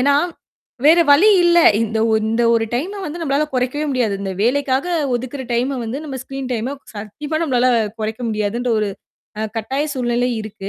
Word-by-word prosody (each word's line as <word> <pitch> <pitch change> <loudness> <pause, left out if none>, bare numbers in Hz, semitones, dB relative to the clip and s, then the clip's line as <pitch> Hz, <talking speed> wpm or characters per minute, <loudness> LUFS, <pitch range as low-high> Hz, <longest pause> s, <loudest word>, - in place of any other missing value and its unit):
ஏன்னா, 280 +2 +3 0.7
வேற 330 +3 +7
வழி 340 +10 +7
இல்ல. 345 0 +5 0.2
இந்த 220 0 -2
ஒ - - +2 0.2
இந்த 225 +2 +1
ஒரு 225 -1 +2
டைம 380 +11 -3
வந்து 330 +3 -6
நம்பளால 290 0 +1
கொறைக்கவே 255 +4 -1
முடியாது. 245 -6 0
இந்த 195 -1 -3
வேலைக்காக 265 +4 +1 0.3
ஒதுக்கற 260 +3 -4
டைம 255 +3 0
வந்து 230 +5 -4
நம்ம 270 -3 -5
ஸ்க்ரீன் 270 -1 -6
டைம 245 +4 -2 0.2
சத்தியமா 280 +10 -5
நம்பளால 255 -6 +2 0.3
கொறைக்க 220 +2 -3
முடியாதுன்ற 220 +3 -1
ஒரு 210 - 0 0.5
அ - - -1
கட்டாய 265 +7 -1
சூழ்நிலை 245 -1 0
இருக்கு. 200 -2 -7
255 Hz, 170 wpm, -19 LUFS, 225-285 Hz, 0.7 s, வேற